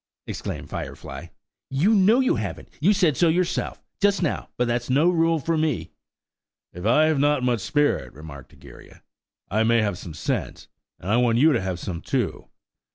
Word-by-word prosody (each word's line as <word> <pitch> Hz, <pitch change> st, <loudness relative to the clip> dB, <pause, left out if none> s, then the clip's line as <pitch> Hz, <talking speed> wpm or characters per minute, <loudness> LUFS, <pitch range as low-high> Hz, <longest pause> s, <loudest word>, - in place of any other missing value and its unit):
exclaimed -, -, -6 dB
Firefly. -, -, -7 dB, 0.4 s
"You 160 Hz, +12 st, +2 dB
know 215 Hz, +5 st, +5 dB
you 255 Hz, -, +2 dB
haven't–you 130 Hz, -, -2 dB
said 180 Hz, -8 st, +2 dB
so 170 Hz, -, +3 dB
yourself, 175 Hz, +2 st, -1 dB, 0.2 s
just 200 Hz, -2 st, +2 dB
now; 155 Hz, -, -2 dB
but 125 Hz, -, +1 dB
that's 120 Hz, +1 st, -2 dB
no 150 Hz, +7 st, +4 dB
rule 165 Hz, -1 st, +2 dB
for 160 Hz, +2 st, -1 dB
me." 140 Hz, -, -1 dB, 0.8 s
"If 90 Hz, +4 st, -4 dB
I 150 Hz, +7 st, +5 dB
have 155 Hz, -3 st, +1 dB
not 145 Hz, -2 st, +2 dB
much 120 Hz, -4 st, +1 dB
spirit," 145 Hz, +7 st, 0 dB
remarked 70 Hz, -3 st, -11 dB
Egeria, -, -, -16 dB, 0.5 s
"I 110 Hz, +3 st, +2 dB
may 115 Hz, 0 st, +3 dB
have 100 Hz, -4 st, -2 dB
some 80 Hz, -4 st, -9 dB
sense, -, -, -3 dB, 0.3 s
and 95 Hz, -, -4 dB
I 115 Hz, -, +4 dB
want 120 Hz, -2 st, +3 dB
you 155 Hz, +5 st, +5 dB
to 120 Hz, -, +1 dB
have 95 Hz, -2 st, -3 dB
some 90 Hz, -3 st, -5 dB
too. -, -, -2 dB
135 Hz, 175 wpm, -24 LUFS, 110-165 Hz, 0.8 s, know